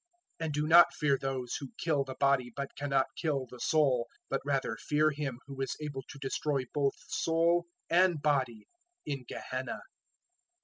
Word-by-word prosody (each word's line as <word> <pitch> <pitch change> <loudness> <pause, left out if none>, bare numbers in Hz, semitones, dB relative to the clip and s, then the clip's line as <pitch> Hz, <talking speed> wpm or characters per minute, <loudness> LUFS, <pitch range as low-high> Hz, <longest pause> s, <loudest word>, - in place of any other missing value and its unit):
010:028 165 - -2
"And 150 - -3
do 150 +1 0
not 170 +1 +8
fear 145 -3 +3
those 130 -2 -3
who 135 -3 -8
kill 150 -4 +1
the 130 -1 -7
body, 135 -3 +2
but 140 -1 -5
cannot 140 -2 +1
kill 145 -5 -1
the 125 0 -12
soul; 135 -6 +2 0.2
but 135 - 0
rather 135 -5 0
fear 155 +1 +2
him 140 -4 -3
who 135 -1 -7
is 135 - -2
able 145 -3 -4
to - - -9
destroy 135 0 -1
both 140 -2 +1
soul 170 +1 +2 0.2
and 175 -2 +4
body 130 -7 0 0.4
in 135 -3 -4
Gehenna. 130 +1 -4
140 Hz, 170 wpm, -31 LUFS, 135-150 Hz, 0.4 s, not